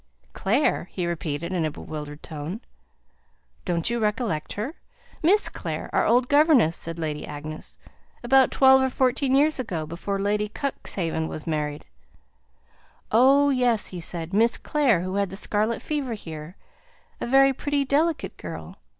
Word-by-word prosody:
"Clare," 225 - +1
he 180 - -3
repeated, 170 0 -3
in 175 -3 0
a 155 - 0
bewildered 150 0 -8
tone. 155 +6 -6 1.1
"Don't 170 +4 0
you 235 - 0
recollect 210 -7 -1
her? 225 +9 -4 0.5
Miss 390 +6 +4
Clare, - - -5
our - - +2
old 245 +2 +3
governess," 285 - +4
said 165 0 -3
Lady 155 -2 -3
Agnes. 155 +1 -7 0.5
"About 265 +2 +5
twelve 265 0 +6
or 265 - +2
fourteen 260 +1 +1
years 295 +1 +3
ago, 175 -11 -3
before 170 +5 -4
Lady 210 +1 0
Cuxhaven 175 - -3
was 155 - -6
married." 150 -2 -3 1.3
"Oh, 275 +5 +5
yes!" 245 -4 +2
said 165 0 -4
he. - - +2
"Miss 230 +1 +3
Clare, 265 - +2
who 185 +1 -4
had 200 -1 +1
the 190 - -7
scarlet 215 +3 -1
fever 280 -6 -2
here; 160 -3 -9 0.6
a - - -3
very 270 +2 +5
pretty 285 +1 -1
delicate 305 +4 0
girl. - - -8
210 Hz, 150 wpm, -25 LUFS, 165-265 Hz, 1.3 s, twelve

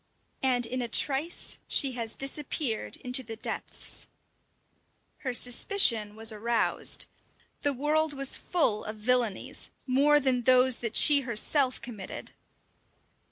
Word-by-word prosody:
And 250 -2 +2
in 255 +2 -4
a 240 - -3
trice 280 +7 -1
she 275 -3 +3
has 230 -3 -5
disappeared 275 -3 -2
into 250 +1 +2
the 225 -2 -8
depths. 220 - -4 1.1
Her 260 - -3
suspicion 235 - +1
was 225 +1 -2
aroused. 230 +2 0 0.6
The 285 - +1
world 300 +3 0
was 275 -1 +2
full 265 -12 0
of 215 - -6
villainies, 230 -1 -1 0.2
more 280 +3 +4
than 260 -3 +1
those 255 0 +4
that 230 -2 -5
she 290 -2 +7
herself 255 +2 +1
committed! 215 -6 -8
250 Hz, 120 wpm, -28 LUFS, 230-275 Hz, 1.1 s, she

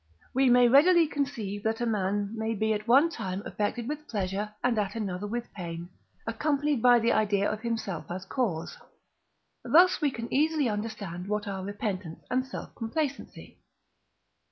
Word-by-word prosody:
we 265 0 +4
may 245 0 +6
readily 330 +7 +6
conceive 235 -9 -3
that 220 +1 -1
a 240 - 0
man 205 -2 0
may 220 0 -2
be 220 +1 +1
at 210 +1 -4
one 270 +7 +6
time 195 - -5
affected 225 +3 -2
with 300 +1 -5
pleasure, 200 0 -2
and 245 -3 +2
at 205 +1 -2
another 205 -3 -3
with 240 +2 -5
pain, 170 -2 -6 0.4
accompanied 285 +3 0
by 245 0 +7
the 235 0 +2
idea 205 -2 +2
of 215 0 -3
himself 220 -7 -3
as 185 +2 -5
cause. 190 - -2 0.9
Thus 360 +3 +5
we 295 - +3
can 235 -3 -6
easily 305 0 +2
understand 210 -5 -4
what 210 0 -2
are 190 -1 -4
Repentance 195 -4 -4
and 255 +1 +2
Self 265 - -8
complacency. 275 +5 -4
220 Hz, 160 wpm, -28 LUFS, 200-255 Hz, 0.9 s, by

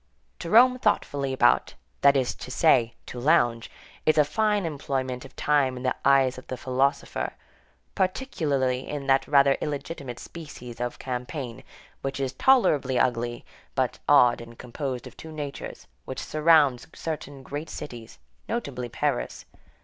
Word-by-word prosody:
To 170 - -5
roam 250 +5 +6
thoughtfully 140 - 0
about, 120 -2 +3 0.3
that 140 0 +6
is 130 -2 0
to - - -10
say, 125 -4 +3
to 125 - -7
lounge, 120 -5 +2 0.3
is 155 - +3
a 150 - +6
fine 210 +3 +1
employment 135 -4 -3
of 135 - -14
time 140 -4 +2
in 125 - -7
the 130 - +1
eyes 135 -2 +4
of - - -16
the 130 - -4
philosopher; 130 +3 -1 0.6
particularly 150 - -1
in 145 -2 -4
that 135 0 +3
rather 140 -1 +4
illegitimate 140 -4 -4
species 125 -8 -9
of 120 0 -3
campaign, 125 0 -5 0.4
which 135 0 -3
is 135 -1 -2
tolerably 145 - +3
ugly 120 -1 0 0.3
but - - 0
odd 120 -1 +6
and 115 0 -12
composed 125 0 -5
of - - -11
two 160 - -10
natures, 145 -2 -6 0.2
which 130 - -5
surrounds 150 -5 +4
certain 145 -4 -6
great 145 +5 -6
cities, 120 -5 -8 0.3
notably 140 - -3
Paris. - - -2
135 Hz, 145 wpm, -26 LUFS, 125-150 Hz, 0.6 s, roam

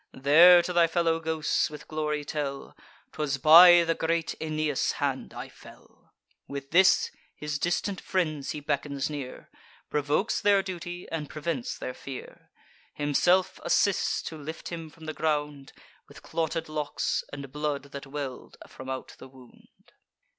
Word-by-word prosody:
There 170 +6 +7
to 180 - -3
thy 170 -1 +5
fellow 165 -1 +1
ghosts 160 -1 0
with 150 -1 -11
glory 150 -1 -2
tell: 140 -2 -5 0.4
''Twas 145 -3 -2
by 175 +4 +9
the 165 0 +1
great 165 0 -1
Aeneas 155 -2 -1
hand - - -3
I - - -7
fell.'" - - -18 0.4
With 140 -1 -7
this, 185 +3 +5 0.2
his 150 -1 -4
distant 180 +4 -1
friends 155 -7 -2
he 150 - -4
beckons 140 0 -2
near, 140 -4 -7 0.4
Provokes 150 +8 0
their 200 -1 +4
duty, 175 -1 -7
and 155 -3 -4
prevents 155 -4 -4
their 125 - -5
fear: 135 0 -10 0.5
Himself 175 +6 +2
assists 200 -2 +1
to 160 - -7
lift 160 +3 -7
him 165 -2 -7
from 160 +1 -15
the 155 - -4
ground, 150 -3 -2 0.4
With - - -15
clotted 165 0 -2
locks, 150 -1 -2
and 140 -2 -8
blood 145 -1 -3
that 140 0 -8
well'd 135 -2 -7
from 130 0 -10
out 130 0 -6
the - - -11
wound. 130 -2 -20
155 Hz, 145 wpm, -27 LUFS, 145-165 Hz, 0.5 s, by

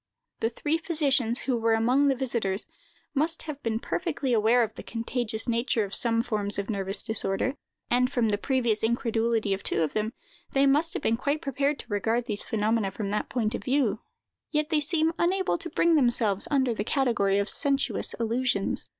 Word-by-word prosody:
The 225 - +1
three 295 +7 -1
physicians, 275 -8 +1
who 260 - 0
were 225 -1 +2
among 250 +6 +3
the 270 - +3
visiters, 235 -7 0 0.5
must 315 +3 0
have 295 -3 -7
been 225 -1 -1
perfectly 290 -1 -2
aware 230 +2 +4
of 220 - -3
the - - -9
contagious 230 -1 -3
nature 235 -1 +1
of 200 0 -6
some 230 -1 +2
forms 210 -4 -1
of 200 +2 -2
nervous 195 -1 -1
disorder, 220 +2 0 0.4
and 250 +1 +3
from 235 -3 +1
the 205 -1 0
previous 240 -4 0
incredulity 225 -2 +1
of 195 - -3
two 165 - +1
of 155 - -2
them, 215 +2 -1 0.4
they 275 0 +4
must 300 +5 +2
have - - -4
been 230 - +2
quite 285 +4 -1
prepared 280 0 -1
to - - -19
regard 225 +2 0
these 210 -3 -2
phenomena 220 -1 0
from 200 +1 -4
that 210 - -2
point 230 -3 -1
of - - -4
view; 275 +2 +1 0.5
yet 305 +1 0
they 310 - +3
seem 320 +2 +1
unable 370 0 +1
to 345 - -6
bring 340 0 +2
them 275 -6 +5 0.4
under 265 -4 +2
the 210 - -2
category 220 -6 +1
of 200 0 0
sensuous 275 +3 +1
illusions. 235 -2 -1
235 Hz, 190 wpm, -27 LUFS, 220-280 Hz, 0.5 s, them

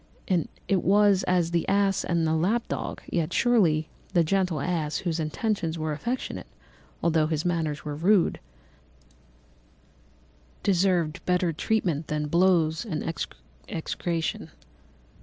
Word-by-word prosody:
It 190 -3 +2
was 200 0 +4
as 175 -2 +2
the 170 -1 0
ass 195 -1 +2
and 170 -2 0
the 160 - +1
lap 195 +9 +1
dog; - - -4
yet 165 -3 -1
surely 170 -11 +3 0.3
the 170 -3 +4
gentle 180 -2 +1
ass 155 -1 -1
whose 165 -1 0
intentions 165 +1 -1
were 155 -1 -2
affectionate, 235 - -4 0.6
although 160 -2 +3
his 155 0 -2
manners 160 -5 -1
were 150 - -3
rude, 180 +4 +3 2.2
deserved 180 -4 +1
better 180 -2 +2
treatment 170 -4 0
than 150 -1 -2
blows 170 -2 +3
and 175 -10 -3 0.7
execration. 165 0 -3
170 Hz, 120 wpm, -26 LUFS, 155-190 Hz, 2.2 s, was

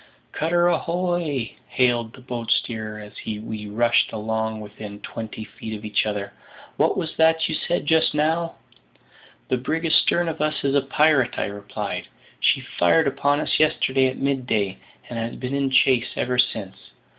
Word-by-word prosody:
"Cutter 175 +2 +2
ahoy!" 175 -7 0
hailed 120 -3 +1
the - - -14
boat 120 -2 -5
steerer 110 -2 -1
as 105 -1 -11
we 105 0 -5
rushed 115 +3 +3
along 110 0 -2
within 105 -1 -9
twenty 110 -1 -6
feet 110 +1 -7
of 105 - -11
each 105 0 +1
other; 105 -1 -3 0.4
"what - - +2
was 160 - -3
that 160 0 +4
you 160 - -3
said 175 +1 -1
just 160 0 +3
now?" 165 +3 +1 0.9
"The 130 - +2
brig 160 +6 -2
astern 170 +1 +3
of 160 -2 -3
us 155 0 0
is 140 -1 +1
a 140 - +4
pirate," 140 -2 +3
I - - 0
replied; 100 0 -5 0.3
"she - - +3
fired 120 - +3
upon 140 +2 +1
us - - 0
yesterday 135 -3 +3
at 130 - -3
mid 135 -2 -1
day, 100 -4 0 0.3
and 120 - -5
has 115 +1 -3
been 130 +1 -4
in 140 -1 +1
chase 130 -2 +4
ever 125 0 0
since. 100 -6 0
125 Hz, 170 wpm, -23 LUFS, 110-155 Hz, 0.9 s, that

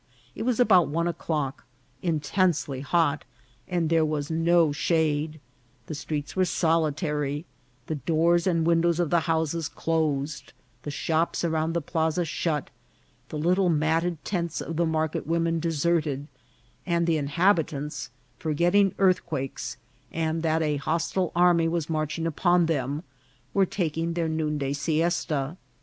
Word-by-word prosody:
It - - -7
was 245 0 0
about 190 -8 +5
one 170 +3 0
o'clock, 155 -4 -2 0.4
intensely 155 -3 0
hot, 160 0 +1 0.4
and 175 -2 0
there 165 0 +3
was 150 -1 -2
no 165 -1 +3
shade; 155 0 0 0.5
the - - -6
streets 150 0 -4
were 185 - +3
solitary, 150 -3 0 0.4
the - - -3
doors 165 +4 +2
and 165 -3 +2
windows 170 0 +3
of 175 -3 0
the 170 - +5
houses 160 0 0
closed, 150 -3 -2 0.3
the 145 - -6
shops 160 +4 0
around 160 -1 0
the 170 -2 -1
plaza 160 +2 0
shut, 155 -2 -2 0.6
the 155 - -5
little 180 +4 +2
matted 160 +1 0
tents 170 -4 -2
of 165 - -5
the 170 +1 +1
market 160 -2 -1
women 165 0 +1
deserted, 155 -3 0 0.6
and 170 -1 +1
the 165 -2 +2
inhabitants, 150 -1 0 0.3
forgetting 175 +5 +2
earthquakes, 175 -11 0 0.3
and 160 0 -1
that 160 0 +1
a 150 -1 0
hos 160 +4 -1
tile 185 -3 0
army 175 -1 +4
was 165 -1 -2
marching 155 +1 -1
upon 175 +2 +3
them, 145 -1 -1 0.5
were 195 -1 +3
taking 165 -2 -1
their 165 -1 -1
noonday 150 -3 -1
siesta. 155 0 -1
160 Hz, 135 wpm, -26 LUFS, 150-170 Hz, 0.6 s, about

